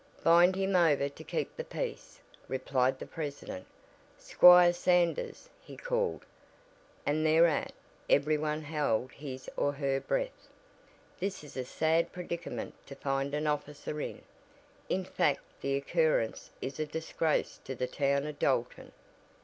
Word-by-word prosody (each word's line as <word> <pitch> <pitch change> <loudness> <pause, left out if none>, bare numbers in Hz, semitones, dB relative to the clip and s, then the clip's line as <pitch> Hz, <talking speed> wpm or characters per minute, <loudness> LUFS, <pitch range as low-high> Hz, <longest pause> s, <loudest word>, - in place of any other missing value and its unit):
"Bind 175 +2 +6
him 195 0 0
over 150 -5 +4
to 140 - -12
keep - - -3
the - - -4
peace," - - -6 0.3
replied 130 0 0
the - - -7
president. 145 - -6 0.5
"Squire 180 -1 +7
Sanders," 175 - +1
he - - -12
called, - - -1 0.8
and 155 +2 +1
thereat 160 0 +3 0.4
every 150 +2 +4
one 150 +1 -2
held 145 -5 -1
his 130 -3 -8
or 145 - +1
her 140 -1 0
breath, - - -3 0.7
"this 195 -3 -3
is 150 - -12
a 130 - -2
sad 160 +5 +1
predicament 175 -1 -5
to 140 - -9
find 135 +1 -1
an 150 +1 -1
officer 150 0 -3
in. - - -6 0.7
In - - 0
fact - - +1 0.2
the 140 0 0
occurrence 150 -4 0
is 135 +2 -5
a 155 - -1
disgrace 160 0 -1
to 135 - -5
the 125 - -1
town 140 +2 0
of 150 -1 -6
Dalton." 125 -3 -1
150 Hz, 140 wpm, -31 LUFS, 140-170 Hz, 0.8 s, Squire